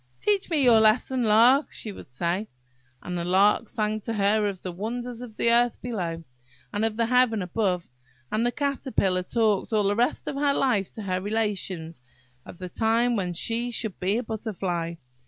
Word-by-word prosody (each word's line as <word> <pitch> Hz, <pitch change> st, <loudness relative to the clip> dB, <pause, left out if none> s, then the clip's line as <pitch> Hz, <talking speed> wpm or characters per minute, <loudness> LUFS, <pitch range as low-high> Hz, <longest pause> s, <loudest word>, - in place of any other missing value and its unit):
"Teach 410 Hz, -3 st, 0 dB
me 310 Hz, -5 st, +2 dB
your 235 Hz, -3 st, +6 dB
lesson, 230 Hz, +4 st, +3 dB
Lark!" 235 Hz, +7 st, +5 dB
she 215 Hz, -, -4 dB
would 190 Hz, -, -12 dB
say; 170 Hz, +11 st, -2 dB, 0.6 s
and 180 Hz, -, -4 dB
the 170 Hz, -, -2 dB
Lark 200 Hz, +5 st, +3 dB
sang 215 Hz, 0 st, -1 dB
to 225 Hz, +2 st, -4 dB
her 210 Hz, 0 st, +2 dB
of 195 Hz, -2 st, -4 dB
the 185 Hz, -, -4 dB
wonders 235 Hz, +6 st, -5 dB
of 230 Hz, -3 st, -10 dB
the 235 Hz, -, +3 dB
earth 240 Hz, 0 st, +3 dB
below, 175 Hz, -9 st, -4 dB, 0.5 s
and 205 Hz, -, -1 dB
of 225 Hz, -1 st, -1 dB
the 230 Hz, -, +2 dB
heaven 240 Hz, -4 st, +3 dB
above. 180 Hz, -2 st, -1 dB, 0.4 s
And 220 Hz, -, +1 dB
the 240 Hz, -, +1 dB
Caterpillar 260 Hz, -10 st, 0 dB
talked 215 Hz, +2 st, 0 dB
all 215 Hz, -2 st, +2 dB
the 200 Hz, +1 st, +1 dB
rest 240 Hz, +3 st, 0 dB
of -, -, -2 dB
her 280 Hz, 0 st, +1 dB
life 220 Hz, -8 st, +1 dB
to 220 Hz, -, -7 dB
her 185 Hz, -2 st, -2 dB
relations 195 Hz, -, -3 dB, 0.5 s
of -, -, -10 dB
the 185 Hz, -, -6 dB
time 230 Hz, +5 st, +1 dB
when 180 Hz, -4 st, -1 dB
she 230 Hz, +7 st, 0 dB
should 225 Hz, -4 st, -4 dB
be 195 Hz, +4 st, +1 dB
a 245 Hz, -, -2 dB
Butterfly. 190 Hz, -7 st, -3 dB
215 Hz, 190 wpm, -26 LUFS, 185-240 Hz, 0.6 s, your